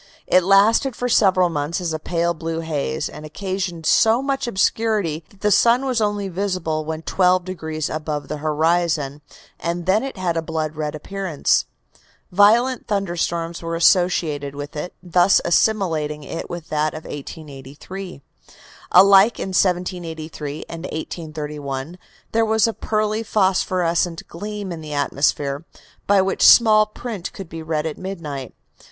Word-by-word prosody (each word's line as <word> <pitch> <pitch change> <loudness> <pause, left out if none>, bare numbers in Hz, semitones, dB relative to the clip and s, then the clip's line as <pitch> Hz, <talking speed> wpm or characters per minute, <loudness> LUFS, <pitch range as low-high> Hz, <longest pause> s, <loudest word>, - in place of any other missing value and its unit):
It 185 - +4
lasted 215 +7 +4
for 245 - -2
several 190 -6 +4
months 150 +2 -2
as 170 -3 -2
a 155 - -3
pale 170 +1 0
blue 165 0 -4
haze, 145 - -2
and - - -10
occasioned 180 +1 -4
so 225 +9 +4
much 275 -2 -1
obscurity 200 -6 0
that 200 - -23
the 210 - +2
sun 235 +6 +4
was 250 -4 0
only 205 -1 0
visible 180 -4 -2
when 160 +1 -4
twelve 180 +1 +2
degrees 160 -4 -4
above 155 -1 -4
the 150 - -4
horizon, 155 -1 0 0.4
and 170 +1 -3
then 195 +4 +3
it 270 -4 -6
had 180 -3 -1
a - - +1
blood 160 -1 -3
red 150 0 -3
appearance. 185 -1 0 0.7
Violent 225 +6 +4
thunderstorms 170 -4 -2
were 165 0 -3
associated 165 -5 +2
with 145 +1 -7
it, 155 +4 -5
thus 180 +1 +4
assimilating 165 -6 +1
it 165 +4 -6
with 175 -2 -7
that 155 0 0
of 155 - -7
1883. 145 +4 -9 0.7
Alike 195 +4 +7
in - - -3
1783 170 -5 -2
and 165 +1 -7
1831 150 -1 -5 0.3
there 225 0 +2
was 220 -1 +3
a 225 - 0
pearly, 215 0 -1
phosphorescent 185 -5 0
gleam 205 +2 -6
in 165 -2 -6
the 150 -1 -6
atmosphere, 145 0 0 0.4
by 200 -1 +4
which 195 - -2
small 215 -2 +7
print 215 -4 -6
could 195 - -8
be 165 0 -8
read 155 -1 -2
at 160 - -4
midnight. 160 -8 -6
175 Hz, 145 wpm, -21 LUFS, 155-195 Hz, 0.7 s, Alike